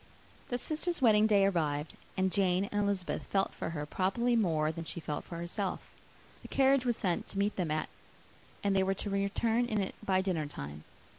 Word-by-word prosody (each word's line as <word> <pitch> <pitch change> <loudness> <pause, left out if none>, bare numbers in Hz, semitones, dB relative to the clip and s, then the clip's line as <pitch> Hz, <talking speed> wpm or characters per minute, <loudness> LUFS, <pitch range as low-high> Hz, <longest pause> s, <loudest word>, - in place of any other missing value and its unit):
Their 245 - 0
sister's 320 +6 -2
wedding 215 -4 +5
day 200 -2 +5
arrived; 155 -5 0 0.2
and 190 0 +2
Jane 185 -1 +2
and 205 - +1
Elizabeth 200 -3 -1
felt 195 -1 +1
for - - -4
her 150 -3 -3
probably 195 +9 +1
more 160 -8 +2
than 165 +1 -6
she 170 - -5
felt 150 -2 -4
for 170 - -7
herself. 180 +3 -2 0.6
The - - -10
carriage 270 -1 +3
was 240 - +1
sent 180 -4 -1
to - - -6
meet 200 +1 +1
them 180 -4 -1
at, 155 0 -1 0.8
and 200 -1 +2
they 190 - +4
were 190 +1 +1
to 200 +1 -3
return 220 +4 +1
in 215 -3 0
it 190 - -1
by 190 -1 +2
dinnertime. 145 - -4
195 Hz, 195 wpm, -32 LUFS, 170-210 Hz, 0.8 s, wedding